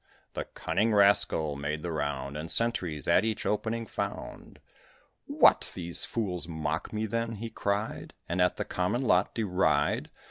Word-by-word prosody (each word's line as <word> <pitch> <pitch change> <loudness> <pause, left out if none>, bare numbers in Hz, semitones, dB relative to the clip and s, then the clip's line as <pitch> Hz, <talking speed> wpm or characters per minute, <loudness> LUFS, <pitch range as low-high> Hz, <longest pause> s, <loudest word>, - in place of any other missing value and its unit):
The - - -3
cunning 110 0 0
rascal 100 -7 +3
made 75 +2 -3
the 85 - -3
round, 70 -2 -3
And 75 +2 -5
sentries 90 - 0
at - - +5
each 110 -1 -2
opening 115 +2 -1
found. - - -6 0.7
"What! - - +5
these 85 -1 -2
fools 90 -7 -2
mock 80 -1 -3
me, 110 0 -1
then?" 115 +1 -2
he 115 +2 -6
cried, 105 0 -3
"And 85 +2 0
at 90 - +3
the - - -3
common 90 +8 -1
lot 95 -6 +2
deride? 90 -9 +1
90 Hz, 150 wpm, -29 LUFS, 80-110 Hz, 0.7 s, at